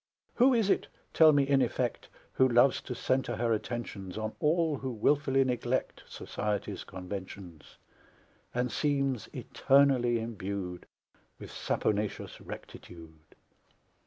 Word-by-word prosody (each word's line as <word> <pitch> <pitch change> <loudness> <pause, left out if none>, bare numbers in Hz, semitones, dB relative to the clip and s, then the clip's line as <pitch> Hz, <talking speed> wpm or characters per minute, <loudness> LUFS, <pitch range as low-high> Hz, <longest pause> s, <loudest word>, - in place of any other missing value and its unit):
Who 255 +2 +5
is 215 -4 +2
it, - - +1 0.3
tell 160 -1 +7
me, 140 -2 +3
in 140 -1 +3
effect, 120 -1 -2 0.2
Who 130 0 +4
loves 120 +3 +4
to 125 - -6
centre 130 -1 0
her 115 0 +1
attentions 105 -4 -5
On 110 0 -3
all 155 -2 +1
who 130 - -4
wilfully 135 +3 +2
neglect 125 0 -2
Society's 105 -1 -4
conventions, 95 -3 -9 0.7
And 125 0 -1
seems 140 -5 0
eternally 130 -4 +3
imbued 100 -5 -5 0.5
With - - -10
saponaceous 105 -1 -2
rectitude? 80 -2 -11
120 Hz, 115 wpm, -30 LUFS, 100-135 Hz, 0.7 s, tell